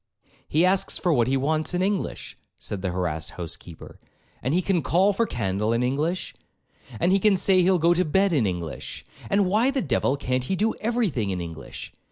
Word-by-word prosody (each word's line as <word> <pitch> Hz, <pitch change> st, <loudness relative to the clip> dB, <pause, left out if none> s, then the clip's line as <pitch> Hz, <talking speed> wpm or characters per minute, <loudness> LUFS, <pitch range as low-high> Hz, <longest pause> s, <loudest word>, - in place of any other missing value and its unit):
'He 160 Hz, +4 st, +3 dB
asks 185 Hz, +1 st, +2 dB
for 175 Hz, -3 st, +1 dB
what 120 Hz, -4 st, +2 dB
he 135 Hz, +1 st, +2 dB
wants 155 Hz, +5 st, 0 dB
in 180 Hz, -, +1 dB
English,' 200 Hz, 0 st, -2 dB, 0.2 s
said 100 Hz, -, -5 dB
the 95 Hz, -, -1 dB
harassed 90 Hz, -4 st, -2 dB
housekeeper, 85 Hz, -1 st, -9 dB, 0.4 s
'and 130 Hz, -, -1 dB
he 170 Hz, -, +3 dB
can 180 Hz, -3 st, +1 dB
call 190 Hz, +7 st, +3 dB
for 230 Hz, +3 st, 0 dB
candle 105 Hz, -, -1 dB
in 115 Hz, +1 st, +1 dB
English, 150 Hz, +8 st, -1 dB, 0.7 s
and 180 Hz, -, +2 dB
he 195 Hz, -, +4 dB
can 200 Hz, -1 st, +4 dB
say 185 Hz, 0 st, +4 dB
he'll 185 Hz, +1 st, +4 dB
go 170 Hz, +1 st, +4 dB
to 180 Hz, +1 st, +2 dB
bed 190 Hz, +3 st, +2 dB
in 125 Hz, -9 st, +2 dB
English; 85 Hz, -4 st, -5 dB, 0.2 s
and 200 Hz, 0 st, +3 dB
why 215 Hz, +7 st, +2 dB
the 275 Hz, 0 st, 0 dB
devil 135 Hz, -, 0 dB
can't 130 Hz, -2 st, -1 dB
he 190 Hz, -, -1 dB
do 215 Hz, +4 st, +1 dB
every 235 Hz, -1 st, +1 dB
thing 115 Hz, -9 st, -2 dB
in 95 Hz, -2 st, -2 dB
English? 80 Hz, -8 st, -8 dB
155 Hz, 205 wpm, -25 LUFS, -, 0.7 s, he